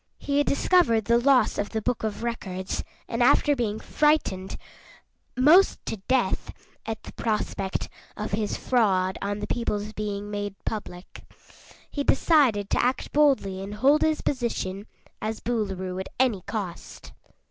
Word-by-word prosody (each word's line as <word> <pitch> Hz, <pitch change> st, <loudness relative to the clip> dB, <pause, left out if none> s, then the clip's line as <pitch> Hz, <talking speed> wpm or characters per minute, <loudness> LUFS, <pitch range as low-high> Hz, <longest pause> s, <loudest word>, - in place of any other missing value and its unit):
He 285 Hz, 0 st, 0 dB
had 290 Hz, -, +1 dB
discovered 270 Hz, -, +3 dB
the 235 Hz, +2 st, +4 dB
loss 250 Hz, -3 st, +3 dB
of 205 Hz, -, -1 dB
the 220 Hz, -, -3 dB
Book 250 Hz, 0 st, -1 dB
of 215 Hz, 0 st, -3 dB
Records 190 Hz, -6 st, -3 dB, 0.2 s
and 230 Hz, 0 st, -2 dB
after 285 Hz, +3 st, +4 dB
being 220 Hz, -5 st, -1 dB
frightened 295 Hz, -12 st, +1 dB, 0.8 s
'most 315 Hz, +9 st, +6 dB
to -, -, -3 dB
death 260 Hz, -1 st, +1 dB, 0.4 s
at 225 Hz, -1 st, -4 dB
the -, -, -10 dB
prospect 210 Hz, -3 st, -2 dB, 0.3 s
of 210 Hz, 0 st, -4 dB
his 210 Hz, +1 st, -1 dB
fraud 190 Hz, -7 st, +1 dB
on 200 Hz, +1 st, -2 dB
the -, -, -2 dB
people's 210 Hz, -2 st, -2 dB
being 205 Hz, -1 st, -4 dB
made 205 Hz, -1 st, -4 dB
public, 185 Hz, -4 st, -6 dB, 0.7 s
he 285 Hz, -, -2 dB
decided 260 Hz, -, +3 dB
to -, -, +3 dB
act 250 Hz, +2 st, -1 dB
boldly 265 Hz, -11 st, +2 dB
and 200 Hz, +2 st, -6 dB
hold 275 Hz, +7 st, +4 dB
his 315 Hz, -1 st, +1 dB
position 220 Hz, -6 st, -2 dB, 0.3 s
as 220 Hz, +1 st, -3 dB
Boolooroo 190 Hz, -6 st, -2 dB
at 190 Hz, -, -5 dB
any 240 Hz, -7 st, +2 dB
cost. 195 Hz, -6 st, -6 dB
220 Hz, 145 wpm, -26 LUFS, 200-255 Hz, 0.8 s, most